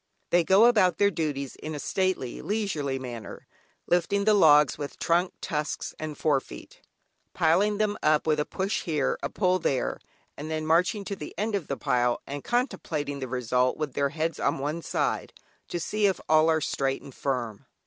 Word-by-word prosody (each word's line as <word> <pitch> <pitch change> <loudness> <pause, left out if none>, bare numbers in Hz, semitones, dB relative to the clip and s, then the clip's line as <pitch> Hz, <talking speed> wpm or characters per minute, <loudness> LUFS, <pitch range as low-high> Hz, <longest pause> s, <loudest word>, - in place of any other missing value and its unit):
They 175 0 +4
go 195 +6 +6
about 190 -8 +4
their 200 0 +4
duties 145 -6 -3
in 155 0 -6
a - - -5
stately, 185 -8 -1
leisurely 175 -11 -2
manner, 120 -4 -8 0.4
lifting 180 +3 +1
the 215 - +5
logs 150 -7 +6
with 145 -1 -6
trunk, 175 +2 +1
tusks, 150 -1 -3
and 155 -1 -5
forefeet; 135 - -2 0.5
piling 200 +6 +3
them 210 -1 0
up 150 0 +3
with 155 -1 +2
a - - +2
push 195 +2 -2
here, 150 -5 0
a - - -2
pull 185 -2 +1
there, 130 - -1 0.4
and 150 +2 -7
then 155 0 -2
marching 180 +6 +2
to 200 - -4
the 150 - -9
end 215 +1 -1
of 195 -6 -2
the 140 - -3
pile 120 -1 +1
and 140 0 -6
contemplating 165 - -2
the 130 - -4
result 125 0 0
with 150 -4 -3
their 140 0 +1
heads 160 +2 -2
on - - +1
one 150 +5 -3
side, - - -2 0.3
to 175 - -3
see 210 +4 +1
if 190 - 0
all 155 +1 +5
are 160 -1 +2
straight 135 -2 -1
and 140 - -11
firm. 120 -7 -3
155 Hz, 185 wpm, -27 LUFS, 140-185 Hz, 0.5 s, go